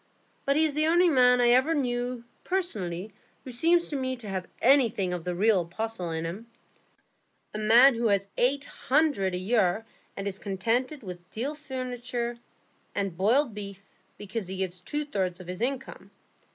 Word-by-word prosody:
But 275 - +2
he's 310 -1 +3
the 305 +2 +2
only 345 +2 +5
man 250 -4 +5
I 240 -1 +4
ever 260 +7 +4
knew 245 -3 -2 0.2
personally 210 - -3 0.3
who 255 - -8
seems 335 +8 +3
to 295 - -3
me 260 -1 -1
to 235 -4 -10
have 185 -2 -3
anything 230 -8 +3
of 175 -1 -5
the 180 -1 -2
real 205 0 +3
apostle 185 +1 -4
in 160 0 -3
him,—a 215 +2 -12
man 235 +6 +7
who 235 0 0
has 200 -1 +1
eight 275 +3 +1
hundred 270 - +1
a - - -1
year 205 +1 +1 0.3
and 195 0 -3
is 195 -1 -3
contented 230 +8 -1
with 180 -2 -9
deal 260 +7 -3
furniture 250 -4 -4 0.6
and 195 -4 -1
boiled 230 - +2
beef 200 -1 -8 0.3
because 205 0 -5
he 190 +1 -5
gives 185 -1 -3
away 180 - -26
two 295 0 -2
thirds 190 -9 -2
of 185 - -10
his 180 +3 -6
income. 265 +2 -3
230 Hz, 170 wpm, -27 LUFS, 190-265 Hz, 0.6 s, man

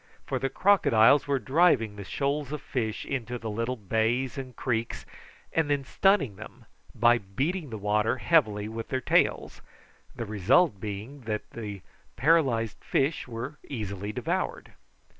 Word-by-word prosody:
For - - -2
the 135 - -1
crocodiles 140 - +4
were 140 -1 +2
driving 130 -4 +3
the 100 - -7
shoals 140 +5 -2
of 150 - -3
fish 110 -4 -3
into 125 -3 -3
the 115 -2 -5
little 115 +4 -2
bays 115 +4 0
and 130 -2 -7
creeks, 115 -3 -2 0.5
and 160 -2 +1
then 145 -1 +1
stunning 140 - +2
them - - -12 0.3
by 120 +1 +4
beating 140 - -3
the 110 - -5
water 105 +3 +1
heavily 110 -9 +2
with 115 +1 -6
their 130 - -1
tails, - - +1 0.5
the 115 - -4
result 110 - +3
being 105 +8 -6
that 105 -1 -3
the 105 -4 -6 0.3
paralysed 130 -6 +2
fish 140 +2 0
were 125 +5 -6
easily 105 -5 -4
devoured. - - -3
120 Hz, 145 wpm, -27 LUFS, 110-140 Hz, 0.5 s, crocodiles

